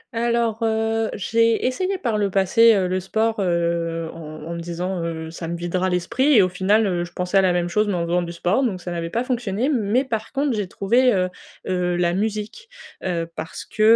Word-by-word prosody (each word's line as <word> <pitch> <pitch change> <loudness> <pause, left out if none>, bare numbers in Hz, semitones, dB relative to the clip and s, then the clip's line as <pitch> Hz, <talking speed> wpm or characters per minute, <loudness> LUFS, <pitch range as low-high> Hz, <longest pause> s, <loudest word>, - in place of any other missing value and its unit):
Alors, 235 -1 0
heu, 225 0 0
j'ai 230 +3 +2
essayé 370 +10 0
par 230 -9 -1
le 200 -1 +1
passé, 205 +4 +5
heu, 185 -2 +1
le 185 +1 0
sport, 220 +4 -1
heu, 170 -2 0
en 155 -2 -9
en 170 +2 -5
me 170 - -5
disant, 175 +1 -3
heu, 160 -1 -4
ça 165 0 -6
me 170 - -3
videra 180 +2 -1
l'esprit 230 +11 +1
et 205 - +7
au 185 - +1
final, 200 +4 +2
heu, 175 -3 0
je 175 - -8
pensais 180 +2 0
à - - +5
la 185 - +3
même 175 0 0
chose 210 +4 +1
mais 200 - 0
en 170 -1 -1
faisant 175 +1 +1
du 170 -1 -5
sport, 180 +9 0
donc 200 -8 -1
ça 175 - -6
n'avait 165 -1 -3
pas 235 +7 -1
fonctionné. 245 -1 -1
Mais 240 -1 +1
par 225 -3 -3
contre 275 -3 0
j'ai 205 -3 -2
trouvé, 240 +8 +2
heu 185 -1 +1 0.4
heu, 180 -1 0
la 175 0 +1
musique, 215 - -3 0.3
heu, 170 -2 -1
parce 160 0 -6
que, 215 - -5
190 Hz, 225 wpm, -22 LUFS, 175-225 Hz, 0.4 s, et